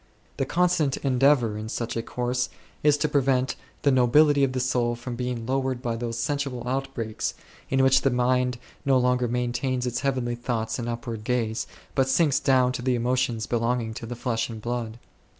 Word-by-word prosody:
The 135 - -1
constant 170 -5 +2
endeavour 130 -5 +2
in 110 +1 -6
such 115 0 -3
a 115 - 0
course 125 +2 -2 0.3
is 150 -1 +4
to 150 - +1
prevent 135 -3 +1 0.3
the 140 - +4
nobility 140 +3 +5
of 130 -1 +1
the 130 - -1
soul 125 -2 +1
from 120 +1 -6
being 125 -1 -3
lowered 130 0 -1
by 120 -2 -2
those 115 0 -4
sensual 130 -1 -2
outbreaks, 130 -4 -3 0.3
in 135 0 +3
which 130 0 +5
the 135 - +3
mind 125 0 +1 0.3
no 135 -2 +4
longer 125 0 +2
maintains 125 +1 -1
its 120 -1 -1
heavenly 130 -3 -1
thoughts 120 -1 -2
and 120 0 -3
upward 115 -2 -5
gaze, 115 -1 -1 0.3
but 135 -2 +2
sinks 145 0 +3
down 130 -2 +3
to 125 - -4
the 125 0 +1
emotions 120 -2 0
belonging 115 -1 0
to 115 - -7
the 120 - -5
flesh 120 -1 -1
and 110 -1 -6
blood. 115 0 -3
125 Hz, 185 wpm, -26 LUFS, 120-135 Hz, 0.3 s, nobility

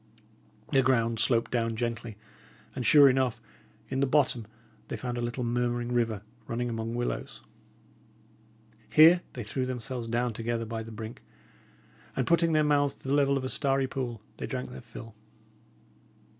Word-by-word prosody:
The 135 -2 +5
ground 115 -3 +2
sloped 115 +1 +2
down 115 -2 0
gently; 115 -1 -3 0.6
and, 125 - -3
sure 145 +3 +8
enough, 130 -2 +2 0.5
in 130 - -2
the 140 - +2
bottom, 130 -5 +2 0.4
they - - -4
found 125 -1 -4
a 120 - -3
little 120 +1 -3
murmuring 120 0 -1
river, 115 -4 0 0.2
running 120 +1 -2
among 115 0 -3
willows. 120 0 -4 1.5
Here 165 +3 +7
they 120 - -5
threw 130 +5 -2
themselves 125 -1 -3
down 120 +1 0
together 115 +1 -2
by 115 0 -4
the 115 0 -8
brink; 110 +1 -8 0.9
and - - 0
putting 165 -1 +3
their 155 0 +4
mouths 145 -1 +2
to - - -12
the 135 - +1
level 140 -1 +3
of 135 - -3
a 130 - -2
starry 135 -1 +1
pool, 120 -5 -4
they - - -4
drank 65 0 -4
their 65 0 -9
fill. 115 -1 -11
120 Hz, 160 wpm, -29 LUFS, 115-135 Hz, 1.5 s, sure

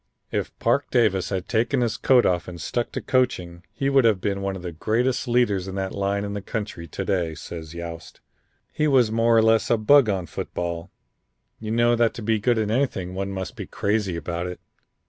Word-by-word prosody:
"If - - -3
Parke - - +1
Davis 95 -6 +2
had 95 -2 -3
taken 120 +3 +1
his 120 -2 0
coat 125 -2 +4
off 90 -1 +1
and 90 -1 -8
stuck 120 +9 -2
to - - -3
coaching 105 -10 0
he 130 +6 -2
would 135 -1 +4
have 110 -4 +3
been 100 0 -2
one 100 0 -2
of 90 - -8
the 90 - -4
greatest 120 - 0
leaders 120 -6 +2
in 95 - -5
that 95 -1 -2
line 100 +1 -1
in 100 - -4
the 100 - -4
country 100 -5 -5
to 95 +5 -5
day," 90 -5 0
says 80 +1 -8
Yost. 85 -1 -8 0.5
"He 155 - +1
was 130 -6 +4
more 115 +1 +3
or 115 - +6
a - - +2
less 110 0 +3
a 120 - +4
bug 125 +2 +5
on 95 -3 -1
football. 85 +2 -4 0.7
You 110 - -6
know 120 +1 +3
that 115 -1 +2
to 115 - -7
be 110 0 +1
good 120 +2 +2
in 110 -1 0
anything 110 -8 -1
one 95 +1 -3
must 95 -1 -5
be - - -7
crazy 100 -3 -1
about 85 +2 -3
it. 90 - -7
100 Hz, 220 wpm, -24 LUFS, 90-115 Hz, 0.7 s, or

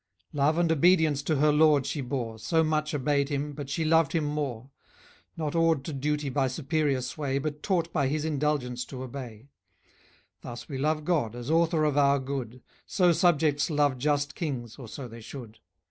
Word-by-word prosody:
Love 145 +3 +2
and 170 -1 +2
obedience 160 -2 +4
to 155 +2 0
her 150 +2 +4
lord 150 -2 +4
she 140 +1 -3
bore; 120 -4 -4
She 160 +9 +2
much 155 -1 0
obeyed 140 0 +1
him, 145 0 -2
but 140 -1 -7
she 160 +3 -1
loved 160 -2 +3
him 165 -2 +1
more: 140 -4 -3 0.7
Not 155 -3 -2
awed 165 -4 +2
to 160 - -4
duty 150 +1 -1
by 135 0 +1
superior 140 0 0
sway, 135 +1 -3
But 150 +1 -4
taught 170 -4 -1
by 140 - +1
his 150 +2 -1
indulgence 145 -5 -1
to 130 -1 -7
obey. 125 -1 -8 0.9
Thus 120 0 -8
we 135 -4 -5
love 155 +2 0
God, 145 -11 0
as 120 +4 -5
author 165 -1 +3
of 150 -2 +1
our 140 0 +4
good; 130 -3 -5 0.2
So 180 -3 +3
subjects 155 -4 +2
love 145 -4 +1
just 145 +1 0
kings, 125 - -4
or 130 -4 -9
so 130 +3 -7
they 115 0 -11
should. 115 -2 -10
145 Hz, 185 wpm, -28 LUFS, 130-155 Hz, 0.9 s, obedience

